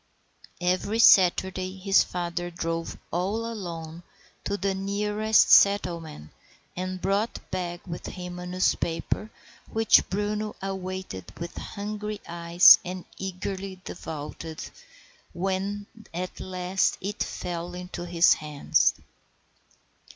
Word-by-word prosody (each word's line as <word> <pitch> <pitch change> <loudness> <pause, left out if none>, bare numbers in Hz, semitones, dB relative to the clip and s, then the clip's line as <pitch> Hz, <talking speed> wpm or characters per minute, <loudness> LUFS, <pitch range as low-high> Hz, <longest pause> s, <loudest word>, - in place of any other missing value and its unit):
Every 185 +4 0
Saturday 185 -2 +5
his 195 +1 +4
father 175 0 -3
drove 165 -1 -3
all 200 +6 -1
alone 170 -7 -6 0.4
to 200 - -1
the 195 +1 0
nearest 210 +3 +2
settlement 170 - +3 0.4
and 185 +1 -4
brought 200 +5 0
back 175 -1 -4
with 170 -2 -6
him 180 -1 -7
a 180 - -6
newspaper, 180 +2 -1 0.4
which 225 0 +4
Bruno 210 +2 -2
awaited 185 - -5
with 170 0 -6
hungry 210 +1 -5
eyes 170 +1 +7
and 180 -1 -6
eagerly 190 0 -5
devoured 160 0 -7 0.7
when 195 +3 -2 0.3
at 180 +1 -4
last 185 0 0
it 200 +2 -5
fell 175 0 -4
into 180 -1 -6
his 170 0 +5
hands. 150 -2 +1
185 Hz, 105 wpm, -26 LUFS, 175-200 Hz, 0.7 s, eyes